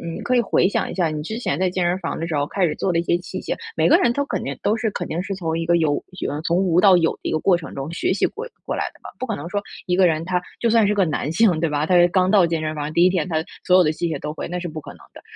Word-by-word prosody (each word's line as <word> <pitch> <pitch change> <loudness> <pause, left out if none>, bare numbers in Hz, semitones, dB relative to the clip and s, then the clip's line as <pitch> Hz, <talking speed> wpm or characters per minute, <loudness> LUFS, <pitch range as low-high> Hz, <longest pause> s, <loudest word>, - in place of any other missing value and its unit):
你 - - -6
可 250 - 0
以 240 - +4
回 185 - +2
想 - - -1
一 - - -5
下 175 -4 +1
你 155 -1 -4
之 220 +9 -5
前 160 - -2
在 185 0 +2
健 180 -1 -1
身 175 +1 +1
房 170 - -3
儿 - - -6
的 165 - -3
时 160 - -2
候 145 0 0
开 190 +2 0
始 155 - 0
做 185 - -1
的 165 - +1
一 - - -1
些 170 - +1
器 180 - -7
械， - - -3 0.2
每 - - +3
个 - - +6
人 245 -10 +2
都 285 +3 -1
肯 - - -3
定 - - -4
都 210 - +2
是 225 0 -1
肯 175 - -4
定 170 - -2
是 195 +1 -4
从 165 -3 -2
一 165 - -2
个 170 +1 +3
有 155 -3 0 0.3
嗯， 150 +1 -4
从 170 0 +1
无 180 -2 +2
到 190 -3 +7
有 165 -2 +2
的 - - -3
一 - - -2
个 155 - 0
过 180 +2 +3
程 165 - -9
中 140 +4 -5
学 175 - 0
习 195 - +1
过 460 +4 -5 0.2
过 - - -2
来 - - -1
的 - - -22
吧， - - -8
不 255 - -2
可 220 - -2
能 145 - -7
说 205 +1 -2 0.2
一 180 - +1
个 185 -1 +5
人 160 -1 0
他 180 -1 0 0.2
就 235 - +1
算 225 -2 +4
是 210 - +2
个 195 -3 +3
男 155 -1 -2
性， 180 -3 +3
对 165 0 0
吧， 150 +1 0
他 180 - +2
是 175 0 +6
刚 185 +1 +2
到 195 -5 +5
健 165 -1 -1
身 155 0 -2
房， 150 0 -4
第 170 +1 +4
1 - - +6
天 180 -4 -1
他 160 -2 -1 0.2
所 180 - +4
有 185 - +6
的 155 - +2
器 170 +2 -2
械 160 - -2
都 150 - -5
会 - - -5
那 180 - -4
是 175 - -5
不 155 0 -6
可 - - -10
能 - - -16
的。 - - -13
175 Hz, 385 characters per minute, -22 LUFS, 160-190 Hz, 0.3 s, 到